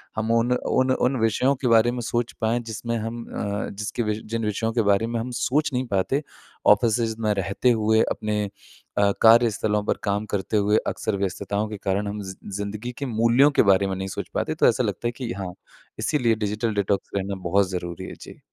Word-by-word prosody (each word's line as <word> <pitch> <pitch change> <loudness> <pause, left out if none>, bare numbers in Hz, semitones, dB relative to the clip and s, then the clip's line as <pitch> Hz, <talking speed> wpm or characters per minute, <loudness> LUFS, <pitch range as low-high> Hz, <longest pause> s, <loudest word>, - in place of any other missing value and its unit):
हम 110 +1 -1
उन 115 +1 +2
उन 130 +1 +1
उन 130 +1 +1
विषयों 115 +5 +2
के 130 -1 -2
बारे 115 +1 +5
में 125 - -4
सोच 120 0 -1
पाएँ 110 +2 +1
जिसमें 115 0 -4
हम 115 +1 -4
अ, 100 0 -3
जिसके 105 +4 -3
वि 105 0 -1
जिन 115 0 -3
विषयों 110 +2 -1
के 120 - +2
बारे 100 +3 +2
में 115 0 -2
हम 120 +3 -4
सोच 150 +4 +1
नहीं 125 +1 0
पाते 110 +8 0 0.4
ऑफिसेज़ 115 +1 +3
में 105 -1 +2
रहते 100 +5 0
हुए 110 0 +3
अपने 105 -1 -1 0.5
अ, 100 0 +4
कार्यस्थलों 110 -2 +4
पर - - 0
काम 100 +1 0
करते 95 +2 -1
हुए, 105 +1 +3
अक्सर 110 -3 -2
व्यस्तताओं 100 +2 -2
के 105 - -5
कारण 100 +1 -1
हम 105 +1 -4
ज़ि 95 -1 -7 0.2
ज़िंदगी 105 +4 -4
के 140 - -3
मूल्यों 120 +4 +4
के - - +4
बारे 95 +1 +3
में 95 - -2
नहीं 95 +1 -4
सोच 95 - -5
पाते। - - -1
तो - - +5
ऐसा - - +2
लगता 120 - -2
है - - 0
कि 125 -3 -4
हाँ, 95 -2 -5 0.5
इसीलिए 120 -7 +2
डिजिटल 110 +1 -2
डिटॉक्स 100 -1 0
करना 100 0 -2
बहुत 100 +1 +3
ज़रूरी 85 -2 -5
है। - - -7
जी। - - -11
110 Hz, 205 wpm, -24 LUFS, 100-120 Hz, 0.5 s, बारे